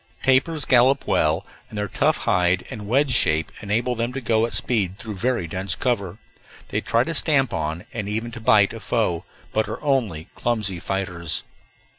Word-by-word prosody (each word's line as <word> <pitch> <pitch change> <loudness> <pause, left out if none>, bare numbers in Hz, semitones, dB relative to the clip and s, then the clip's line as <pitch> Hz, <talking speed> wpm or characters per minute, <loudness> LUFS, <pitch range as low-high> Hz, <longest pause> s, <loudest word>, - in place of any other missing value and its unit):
Tapirs 135 +3 +3
gallop 130 +2 +4
well, 80 +5 +1 0.2
and 110 - -8
their 105 0 -1
tough - - +1
hide 90 0 +2
and 105 -2 -7
wedge 135 +4 +2
shape 80 -8 +2
enable 115 +4 0
them 120 +1 -2
to 135 - -3
go 115 -2 +2
at - - -8
speed 100 -6 0
through 110 +1 -6
very 115 -1 0
dense 95 +4 -2
cover. 100 -7 -1 0.5
They - - -1
try 115 +1 +2
to 165 - -3
stamp 145 -3 +2
on, 80 +1 -3
and 105 -3 -3
even 110 +3 -2
to 115 0 -8
bite, 105 -2 +4
a 115 - -7
foe, 105 -5 -1 0.3
but 110 -1 0
are - - -4
only 110 - 0
clumsy 105 -7 -1
fighters. 90 -4 -2
110 Hz, 180 wpm, -23 LUFS, 95-120 Hz, 0.5 s, gallop